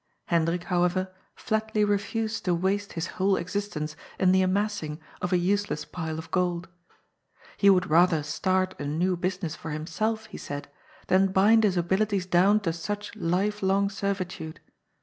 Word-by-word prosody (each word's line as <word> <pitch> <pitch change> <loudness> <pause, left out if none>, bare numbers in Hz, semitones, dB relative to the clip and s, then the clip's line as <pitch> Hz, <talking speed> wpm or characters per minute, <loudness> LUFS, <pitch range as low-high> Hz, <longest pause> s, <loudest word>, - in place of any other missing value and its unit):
Hendrik, 170 +1 +1
however, 180 +1 0 0.2
flatly 220 -1 0
refused 215 +2 -1
to 180 -2 +2
waste 195 +3 -1
his 165 +1 -2
whole 190 +1 +1
existence 170 -5 -3 0.2
in 185 -1 +4
the 190 0 +4
amassing 185 -5 -1 0.2
of 180 - -2
a 180 - +4
useless 185 -4 0
pile 160 -2 -5
of 160 0 -8
gold. 180 -1 0 0.9
He 200 - +5
would 190 -1 +4
rather 165 -2 +4
start 185 +5 0
a 145 - -4
new 175 +5 +1
business 180 -2 -2
for 165 - -8
himself, 215 +9 -2
he - - -10
said, 145 0 -6 0.4
than 190 +1 +3
bind 215 +4 +5
his 195 -4 +2
abilities 190 +2 +1
down 185 +4 +4
to 165 -5 -1
such 205 +6 -5
life 205 +2 0
long 200 +1 +2
servitude. 185 -5 -4
185 Hz, 155 wpm, -27 LUFS, 170-200 Hz, 0.9 s, He